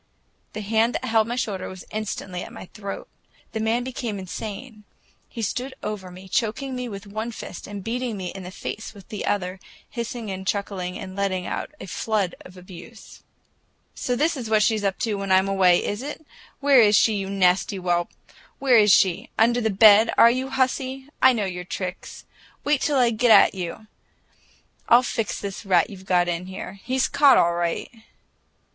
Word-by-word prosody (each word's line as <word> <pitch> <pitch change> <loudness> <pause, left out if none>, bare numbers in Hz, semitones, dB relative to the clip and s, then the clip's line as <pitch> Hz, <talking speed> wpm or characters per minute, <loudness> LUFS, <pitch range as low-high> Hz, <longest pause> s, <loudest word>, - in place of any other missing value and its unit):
The 215 - -5
hand 220 +3 +1
that 255 - -3
held 225 -2 +2
my 240 - -2
shoulder 200 -6 -3
was 185 -1 -10
instantly 200 -4 -4
at - - -8
my - - -9
throat. 200 -2 -6 0.4
The 220 - -3
man 225 +2 0
became 240 -4 -4
insane; 210 +4 -7 0.5
he 230 - -6
stood 255 +5 -3
over 210 -3 -5
me, 185 +1 -12
choking 255 +7 -1
me 250 -1 -4
with 200 -1 -8
one 215 +3 -4
fist 200 - -8
and 205 -1 -7
beating 235 0 -3
me 185 -2 -4
in 195 - -8
the 180 - -7
face 215 +3 -7
with 195 -2 -15
the 210 - -5
other, 185 -2 -1 0.3
hissing 235 -2 -5
and 190 0 -6
chuckling 195 -3 -2
and 185 -1 -8
letting 190 -2 -1
out - - -4
a - - -7
flood 200 0 -1
of 180 0 -14
abuse. 185 +5 -13 0.7
"So 250 - -2
this 315 +6 +1
is 240 -5 -5
what 215 -1 +4
she's 215 -1 +1
up 195 -1 0
to 225 - 0
when 195 -1 -3
I'm 190 +1 +4
away, 185 -3 +3
is 205 +3 -3
it? 295 +3 -7 0.4
Where 275 -3 +6
is 210 -1 +5
she, 220 - +4
you 195 -2 -3
nasty 185 -2 +2
whelp, 175 -2 0 0.5
where 255 -4 +5
is 210 -1 +5
she? 185 -2 +3
Under 235 +2 +3
the 220 - +1
bed, 215 +2 +7
are 235 - +8
you, 260 +2 -2
hussy? 265 +1 -1
I 260 - +8
know 220 -5 -1
your 180 -1 -5
tricks! 180 +1 -6 0.4
Wait 290 -1 +1
till 290 -2 +1
I 245 -2 +4
get 235 +2 +1
at - - +7
you! 185 +3 -6 1.0
I'll 240 +2 +7
fix 225 -3 -2
this 200 +1 -6
rat 185 -3 +2
you've 190 -1 -12
got 175 -1 +3
in 175 +1 -3
here. 190 +1 -8
He's 260 +1 +1
caught, 280 -1 +5
all 170 0 +3
right!" 170 -1 -2
210 Hz, 190 wpm, -24 LUFS, 190-235 Hz, 1.0 s, are